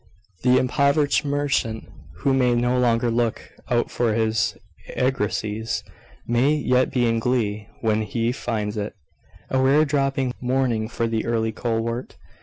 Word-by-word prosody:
The 125 0 +4
impoverished 140 +3 +2
merchant, 140 -6 -1 0.3
who 115 - 0
may 125 -2 +3
no 120 +1 +1
longer 120 -1 +2
look 115 -1 -1 0.2
out 120 -2 +1
for 115 -3 +1
his 110 -1 +1 0.4
argosies, 110 -3 -1 0.4
may 125 +6 +2
yet 130 -3 +2
be 125 -2 +2
in 115 -1 +1
glee 110 -4 -1
when 110 -1 +1
he 115 +3 -1
finds 110 -4 -3
it 105 0 -4 0.6
"a 130 - +2
rare 140 +4 +4
dropping 135 -3 0
morning 125 -3 0
for 115 -1 -1
the 115 -1 -1
early 110 -1 0
colewort." 115 +1 -3
120 Hz, 140 wpm, -23 LUFS, 110-130 Hz, 0.6 s, The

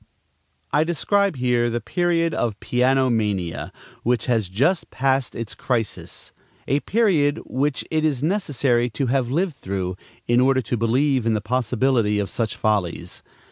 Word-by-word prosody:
I 150 - +3
describe 195 +4 +1
here 125 -2 +1
the 120 0 -1
period 165 +5 0
of 110 -7 -1
piano 130 +2 +2
mania, 100 -7 -1 0.3
which 120 -1 +1
has 115 -7 +1
just 140 - +1
passed 135 -1 0
its 115 -2 -5
crisis; 115 -5 -3 0.4
a 140 - +2
period 165 -9 +2
which 135 +2 -1
it 155 -1 +1
is 145 -4 0
necessary 140 - +1
to 125 +5 -2
have 130 -3 +1
lived 170 +5 0
through, 95 -5 -4 0.3
in 120 +1 +4
order 130 0 +4
to 120 - -2
believe 125 +2 +1
in 110 - +2
the - - +1
possibility 120 -1 +1
of 100 -1 -2
such 115 -2 -2
follies. 105 -5 -1
125 Hz, 150 wpm, -23 LUFS, 115-145 Hz, 0.4 s, in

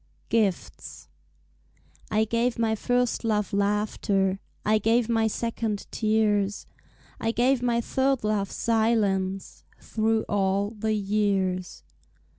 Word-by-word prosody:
Gifts 210 -5 -2 1.0
I 215 +1 +2
gave 235 +2 0
my 225 -1 +1
first 245 +3 0
love 210 -3 0
laughter, 200 -1 0 0.3
I 215 +1 +3
gave 225 +2 +2
my 225 -1 +2
second 225 -2 -3
tears, 210 -2 +1 0.5
I 225 -2 0
gave 250 +2 +2
my 240 -1 +1
third 265 +1 0
love 210 -2 0
silence 205 -4 0 0.2
Through 220 0 0
all 200 0 0
the 220 0 -2
years. 195 - -1
215 Hz, 105 wpm, -26 LUFS, 200-230 Hz, 1.0 s, I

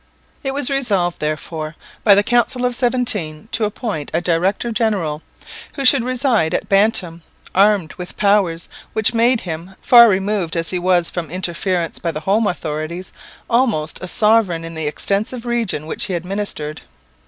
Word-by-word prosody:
It 270 -1 -3
was 285 -1 +1
resolved, 200 -11 0
therefore, 155 +1 -4 0.3
by 205 -3 +7
the 205 - +3
Council 245 +2 +1
of 245 -1 0
Seventeen 225 -9 0
to 225 -1 0
appoint 205 - -4
a - - +3
director 180 +7 0
general, 200 -10 -1 0.5
who 275 - -3
should 255 -1 +6
reside 245 - +1
at - - -2
Bantam, 195 -4 +2 0.3
armed 195 -4 +3
with 180 - -8
powers 195 -5 +2 0.3
which 220 +1 +2
made 235 +1 +3
him, 175 +2 -7
far 235 -2 +7
removed 190 -3 0
as 165 0 -1
he 180 - -1
was 175 -1 +1
from 170 -4 -4
interference 175 0 -2
by 170 - -2
the 155 -1 -4
home 205 +6 +1
authorities, 165 +1 -4 0.3
almost 230 -11 0
a 185 - -5
sovereign 210 -6 +2
in 165 - -8
the 160 -2 -3
extensive 210 +10 -2
region 230 -10 -1
which 160 - -3
he 190 -2 -3
administered. 175 -4 -4
195 Hz, 160 wpm, -19 LUFS, 165-230 Hz, 0.5 s, by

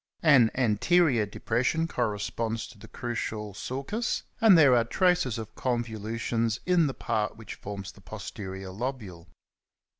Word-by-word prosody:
An 135 -8 +6
anterior 125 - +3
depression 125 +10 0
corresponds 115 -2 -2
to 115 - -15
the - - -12
crucial 110 -3 -4
sulcus, 140 - -3 0.2
and 220 -6 +7
there 140 -6 +7
are 120 - +4
traces 180 - +1
of 110 -1 -7
convolutions 115 -1 -2
in 180 -3 +4
the 135 - -4
part 110 -2 -2
which 110 -2 -8
forms 100 -1 -7
the 100 - -19
posterior 95 -2 -7
lobule." 100 -5 -5
115 Hz, 130 wpm, -28 LUFS, 105-135 Hz, 0.2 s, and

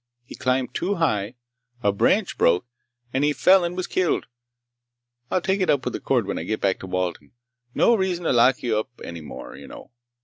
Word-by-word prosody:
He - - -11
climbed 130 0 -1
too 195 +4 -1
high, 120 - 0 0.5
a 100 - +4
branch 185 - +1
broke, 85 +5 +3 0.5
and 135 - +1
he 150 0 +3
fell 185 +4 +5
and 175 +1 -3
was 185 - -1
killed. 185 -3 0 1.0
I'll 185 - +1
take 190 +1 0
it 185 - +1
up 135 -3 +2
with - - -2
the - - -3
court - - +1
when - - -3
I - - -4
get 110 +5 -2
back 95 -2 0
to 95 - -8
Walden. 90 -1 -3 0.4
No 235 - +5
reason 190 -5 0
to 160 - +1
lock 125 +2 +4
you 110 -3 +1
up 110 - -5
any 85 -1 -7
more, 75 - -9
you 70 +1 -11
know. - - -12
130 Hz, 210 wpm, -24 LUFS, -, 1.0 s, fell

